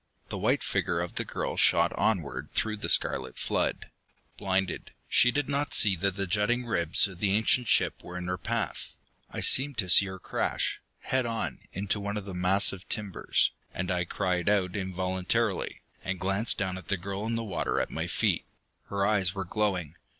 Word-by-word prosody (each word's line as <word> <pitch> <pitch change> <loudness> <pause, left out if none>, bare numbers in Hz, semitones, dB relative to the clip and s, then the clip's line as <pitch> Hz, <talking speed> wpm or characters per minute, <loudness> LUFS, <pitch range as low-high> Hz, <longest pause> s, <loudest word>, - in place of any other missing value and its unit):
The - - -4
white - - +1
figure - - -1
of 85 0 -3
the - - -2
girl - - -4
shot - - +4
onward 75 - -1
through 110 -1 0
the - - -4
scarlet - - +1
flood. - - -2 0.4
Blinded, 95 -1 -2
she 120 - +5
did 145 +2 -1
not 145 +1 -1
see 100 -3 +6
that 95 +2 0
the 100 0 -1
jutting 105 +6 0
ribs 85 -5 +4
of 95 -3 -11
the 100 - +1
ancient 110 +3 +3
ship - - +2
were 90 0 -7
in 90 - -5
her 90 0 -3
path. - - -3 0.3
I - - -5
seemed 140 0 +4
to 95 -5 +1
see 100 - +7
her 95 0 -7
crash, - - -2 0.2
head 130 -2 0
on, 115 -1 -3
into 100 +2 -1
one 100 +1 -3
of 105 - -5
the 100 - -7
massive 95 +2 +2
timbers, 105 -4 +1 0.2
and 90 0 -2
I 90 -1 0
cried 90 +1 -1
out 95 -3 +1
involuntarily, 95 +2 -1 0.2
and 95 -1 -3
glanced 95 +5 +1
down 95 -3 -2
at 90 - -15
the 95 - 0
girl 100 +4 -5
in 115 - -1
the 115 - -2
water 100 -6 -1
at - - -2
my - - -3
feet. - - 0 0.4
Her 100 0 -1
eyes 100 -2 +2
were 95 -1 -3
glowing. 90 -5 -2
95 Hz, 190 wpm, -28 LUFS, 90-105 Hz, 0.4 s, see